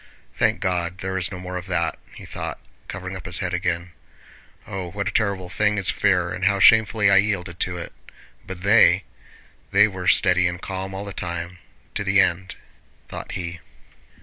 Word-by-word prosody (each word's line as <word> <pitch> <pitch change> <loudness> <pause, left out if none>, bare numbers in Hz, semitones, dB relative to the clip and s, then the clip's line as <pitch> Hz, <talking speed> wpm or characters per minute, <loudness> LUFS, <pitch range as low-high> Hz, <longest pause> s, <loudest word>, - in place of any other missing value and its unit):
"Thank - - +1
God, 90 -1 -1
there 95 +1 -4
is 95 0 -1
no 90 - -6
more 90 0 -5
of 90 +1 -7
that!" 85 -3 -1 0.2
he - - -10
thought, - - -6 0.3
covering - - -6
up - - -8
his - - -2
head - - -2
again. 85 +1 -2 0.7
"Oh, 95 -2 -5
what 100 +2 -4
a - - -1
terrible 100 -4 0
thing 105 +3 +1
is 100 - +3
fear, 90 -4 +1
and - - -2
how 100 -1 +3
shamefully 110 -1 +5
I 95 - +6
yielded 95 -4 0
to 90 -1 -1
it! 85 - -7 0.5
But 95 -2 -8
they... 100 -3 +6 0.7
they 100 +2 +5
were 95 -3 -6
steady 90 -2 +4
and 90 0 -4
calm 95 0 -5
all 100 +1 -5
the 100 - -7
time, 85 0 -5 0.3
to - - -2
the 100 0 +3
end..." 95 +1 +1 0.5
thought - - -6
he. 85 -2 -5
95 Hz, 185 wpm, -23 LUFS, 90-100 Hz, 0.7 s, I